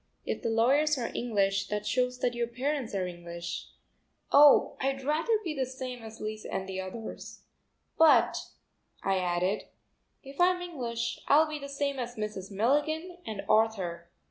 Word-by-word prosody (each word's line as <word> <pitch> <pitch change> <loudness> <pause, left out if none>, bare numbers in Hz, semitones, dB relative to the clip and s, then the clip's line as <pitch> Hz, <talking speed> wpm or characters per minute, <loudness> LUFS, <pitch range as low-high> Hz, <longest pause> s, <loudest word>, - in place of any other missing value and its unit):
"If - - -3
the 230 - -1
lawyers 275 +7 +3
are 235 -2 -3
English, 200 -4 0
that 210 0 -3
shows 250 +1 0
that 245 - +1
your 240 0 -1
parents 255 -1 -2
are 190 -2 0
English." 170 -1 -6 0.6
"Oh, 285 0 +7
I'd 270 0 -1
rather 315 - +2
be 330 - -2
the 265 -3 -1
same 255 -1 -6
as 220 0 -10
Lise 215 0 -5
and 190 - -4
the 190 0 -3
others. 220 +4 -8 0.6
But," 320 -1 +6 0.7
I 195 -1 +2
added, 180 +3 0 0.6
"if 275 +4 -6
I'm 360 0 +4
English 245 -10 -3
I'll 310 +3 +6
be 305 -1 -5
the 280 0 -7
same 280 -1 -2
as 240 0 -4
Mrs. 210 -3 -5
Milligan 295 - 0
and 210 -3 -4
Arthur." 190 -6 +1
240 Hz, 160 wpm, -29 LUFS, 200-280 Hz, 0.7 s, Oh